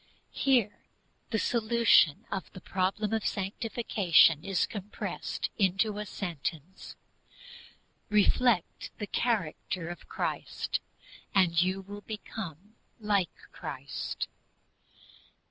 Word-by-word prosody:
Here 245 -7 +2 0.5
THE 220 - 0
SOLUTION 230 -9 +4
OF 190 - -4
THE 185 - -8
PROBLEM 195 +4 -1
OF 220 -2 0
SANCTIFICATION 195 -6 +3
is 195 -2 +1
compressed 205 -1 -4
into 200 +2 +2
a 210 - -4
sentence: 175 -1 -5 1.1
Reflect 210 -1 +2
the 210 - -3
character 185 -6 -1
of 175 - -9
Christ, - - -2 0.6
and 170 -3 +5
you 185 +2 +1
will 205 +2 -9
become 205 -3 -7 0.3
like 205 -5 +2 0.2
Christ. - - -5
195 Hz, 95 wpm, -30 LUFS, 180-215 Hz, 1.1 s, and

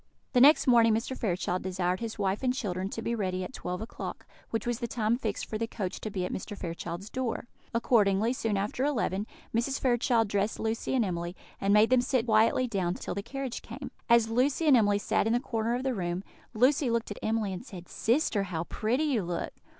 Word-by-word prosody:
The 250 - +5
next 295 +4 +7
morning 230 -3 +5
Mr. 230 +4 -2
Fairchild 185 -5 -1
desired 185 0 -1
his 230 -2 -5
wife 195 -1 0
and 255 -1 +2
children 190 -6 -2
to 225 - -5
be 235 - -1
ready 185 -4 -1
at 185 - -7
twelve 180 -5 -4
o'clock, 225 - -7 0.2
which 225 -2 -2
was 240 -1 -1
the 240 - -2
time 225 -1 +1
fixed 220 -5 -3
for 215 - -4
the 230 - -1
coach 195 -5 -4
to 215 - -3
be 190 -3 -2
at - - -4
Mr. 205 +2 -5
Fairchild's 170 +2 -5
door. 255 -3 -2 0.3
Accordingly, 225 -1 +3
soon 225 -5 -1
after 205 +6 -1
eleven, 220 -7 0 0.3
Mrs. 240 +4 0
Fairchild 240 -3 +2
dressed 205 +1 -1
Lucy 225 +3 -1
and 240 -4 +3
Emily, 175 -1 -3 0.2
and 195 - +1
made 210 +3 +5
them 255 -1 +6
sit 245 -1 +1
quietly 225 +3 +4
down 185 -6 -1
till - - -5
the 200 - -3
carriage 265 +3 -5
came. 255 +3 -8 0.2
As 235 -1 +6
Lucy 265 +7 +2
and 290 -4 +7
Emily 205 -3 +4
sat 205 - +1
in 225 - +2
the 240 - +3
corner 230 -1 -1
of 250 - -3
the 265 -1 0
room, 180 -2 -2 0.3
Lucy 260 +3 +3
looked 230 -2 -1
at 205 - -6
Emily, 220 -3 0
and 185 - -6
said: 185 -8 -10
"Sister, 225 -4 +1
how 165 -3 -3
pretty 230 - -1
you 275 -8 +1
look!" 175 -1 -3
225 Hz, 220 wpm, -29 LUFS, 195-245 Hz, 0.3 s, next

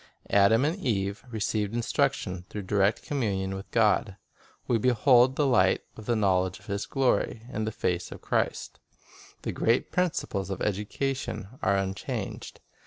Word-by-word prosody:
Adam 105 +6 +5
and 160 +5 0
Eve 100 - -1
received 110 -1 -1
instruction 95 -5 0
through 105 - -5
direct 100 +2 +1
communion 100 -9 -1
with 95 +1 -7
God; 105 -3 +2 0.5
we 115 - +2
behold 125 +2 +4
"the 145 - +2
light 95 -8 +3
of 110 - -11
the 120 - +2
knowledge 95 -3 +1
of - - -19
His 100 0 -3
glory" 125 -4 0
in 110 +1 -1
the 110 - -2
face 90 -4 -2
of - - -8
Christ. - - -2 0.6
The - - -2
great 115 +2 +1
principles 155 - -1
of 95 - -3
education 105 +1 -2
are 100 +1 +2
unchanged. 95 0 -4
105 Hz, 150 wpm, -28 LUFS, 95-120 Hz, 0.6 s, Adam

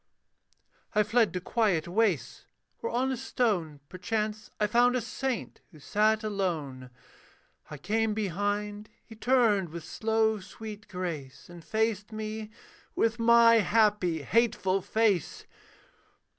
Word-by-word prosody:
I 210 - +5
fled 225 +1 +2
to 180 - -2
quiet 185 -5 0
wastes, 180 - 0 0.3
where 465 - -3
on 260 +2 0
a - - -1
stone, 195 - -1
Perchance, 215 +4 -3
I 210 - +3
found 240 +4 +3
a - - +2
saint, 260 +1 -4
who 160 - -16
sat 215 +7 +1
alone; 160 -11 -3 0.8
I 150 - -7
came 215 +7 0
behind: 205 +1 -2 0.2
he 225 - -13
turned 220 -6 +2
with 170 +1 -8
slow, 220 +3 0
sweet 210 +2 -10
grace, 175 -6 -6
And 170 -1 -12
faced 220 +2 -1
me 215 0 -5 0.5
with 230 +1 +1
my 230 0 +6
happy, 210 -6 +2
hateful 200 - +1
face. 205 -2 0
210 Hz, 125 wpm, -28 LUFS, 180-225 Hz, 0.8 s, my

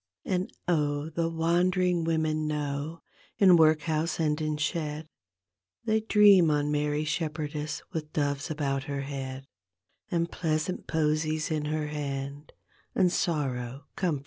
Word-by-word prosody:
And 185 0 -1 0.2
O 150 -3 +1
the 165 +1 -1
wandering 175 +2 +2
women 155 -1 0
know, 150 +1 -3 0.3
in 185 -3 +7
workhouse 160 0 +2
and 155 -1 +1
in 155 -1 -1
shed, 150 0 -2 0.8
They 220 -1 +3
dream 205 -5 +6
on 145 0 +1
Mary 150 0 0
Shepherdess 150 -1 -3
with 155 -2 -4
doves 145 +1 -1
about 140 -3 -1
her 140 -1 -3
head, 135 -1 -5 0.6
And 170 -1 0
pleasant 160 +1 -2
posies 155 0 0
in 155 -1 -1
her 155 0 -1
hand, 140 0 -5 0.4
and 185 -2 +4
sorrow 135 -6 -2
comforted. 175 -7 0
155 Hz, 125 wpm, -28 LUFS, 145-165 Hz, 0.8 s, in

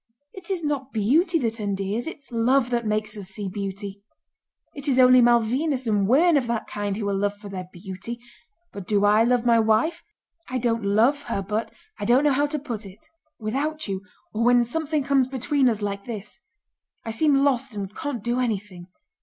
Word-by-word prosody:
It 375 -1 -10
is 370 -4 -2
not 280 -3 -2
beauty 300 - +2
that 230 -5 -2
endears, 200 +3 -2
it's 285 -5 -9
love 245 +2 +2
that 235 -2 0
makes 215 0 -1
us 200 -3 -7
see 195 +1 -5
beauty. 200 +1 -5 0.7
It 285 0 -6
is 265 -3 +2
only 255 -1 +7
Malvínas 250 +4 +2
and 205 -3 +1
women 310 - +5
of 255 -4 0
that 235 -1 -2
kind 205 -1 -3
who 210 -2 -3
are 200 - 0
loved 205 +1 -1
for 205 -1 -9
their 185 -2 -6
beauty. 190 +6 -7 0.5
But 200 -3 -8
do 205 -1 +2
I 210 +2 +5
love 245 0 +2
my 235 -1 +5
wife? 225 +10 +2 0.5
I 255 - -1
don't 230 -2 0
love 225 +8 +3
her, 200 -4 -2
but... 210 +3 -2 0.3
I - - -3
don't 245 +6 +4
know 295 - +4
how 290 +2 +2
to 300 +1 -3
put 240 -7 -5
it. 195 +1 -14 0.3
Without 280 +8 -2
you, 190 -1 -3 0.3
or 220 +2 0
when 245 0 +5
something 300 +4 -1
comes 270 -2 +2
between 265 +1 +1
us 215 -2 -2
like 200 -1 -3
this, 215 -4 -7 0.7
I 225 - -3
seem 285 +6 +2
lost 270 -3 +1
and 200 -1 -5
can't 285 -9 -4
do 240 +1 0
anything. 205 -7 -3
230 Hz, 195 wpm, -24 LUFS, 205-270 Hz, 0.7 s, only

